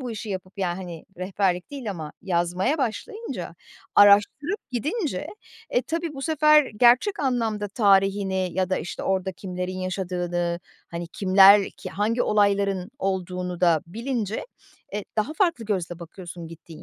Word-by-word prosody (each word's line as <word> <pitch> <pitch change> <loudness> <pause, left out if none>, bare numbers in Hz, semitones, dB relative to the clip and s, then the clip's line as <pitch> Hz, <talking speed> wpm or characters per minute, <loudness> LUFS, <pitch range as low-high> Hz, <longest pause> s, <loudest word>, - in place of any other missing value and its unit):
bu 250 -2 -5
işi 220 0 -6
yapıp 185 0 -6
ya 175 -3 -1
hani 175 -3 -8
rehberlik 185 0 -1
değil 265 -7 -5
ama 160 -5 -6
yazmaya 180 - 0
başlayınca, 420 - -4 0.4
araştırıp 210 - +5
gidince, 285 - -2 0.4
e 245 - +2
tabii 330 +3 -3
bu 270 - -6
sefer 305 -2 +4
gerçek 250 - +4
anlamda 225 -6 0
tarihini 195 -3 +2
ya 185 +1 -1
da, 185 - +1
işte, - - -6
orada 190 0 0
kimlerin 180 0 -5
yaşadığını, 175 -2 -2 0.3
hani 170 0 -5
kimler, 195 +1 +6
ki - - -9
hangi 225 +4 0
olayların 200 -3 +1
olduğunu 180 -4 -3
da 170 -4 +4
bilince, 225 - -3 0.5
e 210 - -3
daha 215 +8 0
farklı 335 - +1
gözle 180 -5 -2
bakıyorsun 175 0 -9
gittiğin 165 -1 -12
195 Hz, 140 wpm, -25 LUFS, 180-240 Hz, 0.5 s, kimler